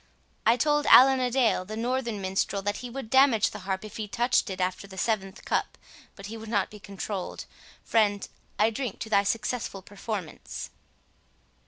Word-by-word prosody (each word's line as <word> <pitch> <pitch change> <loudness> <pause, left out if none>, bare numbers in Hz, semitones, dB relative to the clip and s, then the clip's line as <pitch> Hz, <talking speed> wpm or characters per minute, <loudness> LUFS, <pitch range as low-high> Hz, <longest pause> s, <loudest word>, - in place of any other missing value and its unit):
—I 230 +2 +6
told 295 +1 +2
Allan 265 +1 +8
a 250 -1 +1
Dale, 240 -6 +2
the 215 +4 -7
northern 240 -2 -1
minstrel, 195 +1 -1
that 205 +1 -1
he 250 - -7
would 240 -2 -7
damage 265 -5 +5
the - - -7
harp 190 +2 -2
if 215 - -9
he 215 -2 -4
touched 240 +1 +1
it 190 -1 -5
after 185 +2 -2
the 190 -1 -12
seventh 195 -2 -2
cup, - - -1 0.4
but 200 - -10
he 220 +3 -6
would 220 0 -9
not 205 -4 0
be 210 - -11
controlled—Friend, 205 +1 -3 0.3
I 215 +2 +3
drink 235 -2 -4
to 220 - -5
thy 200 - +5
successful 215 -1 -2
performance." 200 -4 -6
215 Hz, 175 wpm, -27 LUFS, 200-240 Hz, 0.4 s, Allan